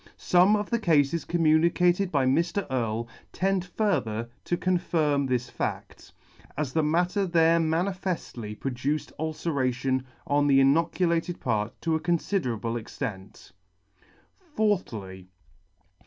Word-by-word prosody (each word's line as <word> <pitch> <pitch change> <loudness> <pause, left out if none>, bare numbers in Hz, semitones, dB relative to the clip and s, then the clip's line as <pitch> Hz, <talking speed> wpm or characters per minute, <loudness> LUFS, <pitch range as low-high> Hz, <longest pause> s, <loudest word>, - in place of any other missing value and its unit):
Some 185 +4 +4
of 210 +1 -3
the 235 - +1
Cafes 160 -4 +2
communicated 175 +3 +2
by 140 -3 +2
Mr. 170 +9 +1
Earle 115 -2 -1 0.2
tend 190 -1 0
further 125 - -1
to 175 - 0
confirm 160 -6 +1
this 125 -1 -1
fadt, - - -5 0.5
as 145 -3 -2
the 160 - +2
matter 175 +6 +1
there 165 -1 +4
manifeftly 165 - -2
produced 135 +3 -2
ulceration 130 -5 -1 0.2
on 145 0 +2
the 135 -1 +5
inoculated 165 +4 +2
part 110 -2 -2
to 165 - +1
a 160 - +1
confiderable 125 - -1
extent. 100 -6 -7 1.1
4thly. 110 - -1
155 Hz, 110 wpm, -27 LUFS, 130-175 Hz, 1.1 s, the